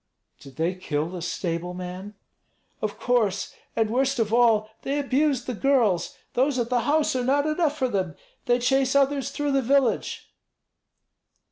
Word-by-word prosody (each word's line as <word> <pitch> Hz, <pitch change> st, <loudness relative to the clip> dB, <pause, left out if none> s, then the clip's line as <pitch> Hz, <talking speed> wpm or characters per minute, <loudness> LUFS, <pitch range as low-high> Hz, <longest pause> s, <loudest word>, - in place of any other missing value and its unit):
"Did 135 Hz, -2 st, -14 dB
they 165 Hz, +3 st, 0 dB
kill 160 Hz, -4 st, -3 dB
the 180 Hz, -1 st, -6 dB
stable 175 Hz, 0 st, -3 dB
man?" 185 Hz, +3 st, -7 dB, 0.7 s
"Of -, -, -3 dB
course. 220 Hz, -6 st, 0 dB, 0.2 s
And 220 Hz, -1 st, +1 dB
worst 270 Hz, +2 st, +1 dB
of 225 Hz, -2 st, 0 dB
all, 225 Hz, -3 st, +3 dB
they 280 Hz, +1 st, -2 dB
abused 280 Hz, -2 st, +1 dB
the 250 Hz, -, -3 dB
girls. 230 Hz, -, +1 dB, 0.2 s
Those 265 Hz, +2 st, +1 dB
at 240 Hz, 0 st, -1 dB
the 245 Hz, -, +3 dB
house 305 Hz, -2 st, +2 dB
are 250 Hz, -, 0 dB
not 280 Hz, +3 st, +2 dB
enough 310 Hz, -1 st, 0 dB
for 260 Hz, -, +1 dB
them; 190 Hz, -8 st, -2 dB, 0.3 s
they 245 Hz, 0 st, +4 dB
chase 265 Hz, +2 st, +1 dB
others 280 Hz, -1 st, +2 dB
through 290 Hz, -1 st, -2 dB
the 275 Hz, 0 st, +2 dB
village." 265 Hz, -1 st, 0 dB
245 Hz, 160 wpm, -25 LUFS, 190-275 Hz, 0.7 s, they